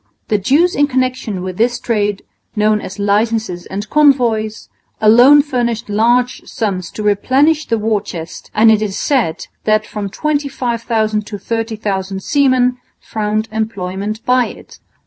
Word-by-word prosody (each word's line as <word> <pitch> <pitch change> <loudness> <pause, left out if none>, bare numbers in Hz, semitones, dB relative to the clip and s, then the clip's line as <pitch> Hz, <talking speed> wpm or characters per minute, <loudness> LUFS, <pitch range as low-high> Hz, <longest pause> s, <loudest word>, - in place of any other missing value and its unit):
The 210 - +2
dues 290 - +2
in 290 0 +3
connection 255 -7 -2
with 185 -1 -5
this 240 +2 +1
trade, 205 -3 -1 0.3
known 210 0 +2
as 185 - -8
licences 205 -2 0
and 205 +2 -5
convoys, 240 -7 +2 0.3
alone 245 +7 +7
furnished 235 -5 -2
large 240 +4 +2
sums 190 -6 -3
to 215 - -5
replenish 270 +10 +2
the 230 - +1
war 215 -1 0
chest; 165 -3 -8
and 220 +1 +6
it 215 -1 +3
is 205 -3 -2
said 245 - 0 0.2
that 215 0 +2
from 205 -2 -5
25,000 235 -6 -1
to 205 - -6
30,000 205 -4 -3
seamen 255 -3 +2 0.2
found 215 0 -2
employment 215 0 -4
by 250 -1 +3
it. - - -13
220 Hz, 140 wpm, -16 LUFS, 205-250 Hz, 0.3 s, alone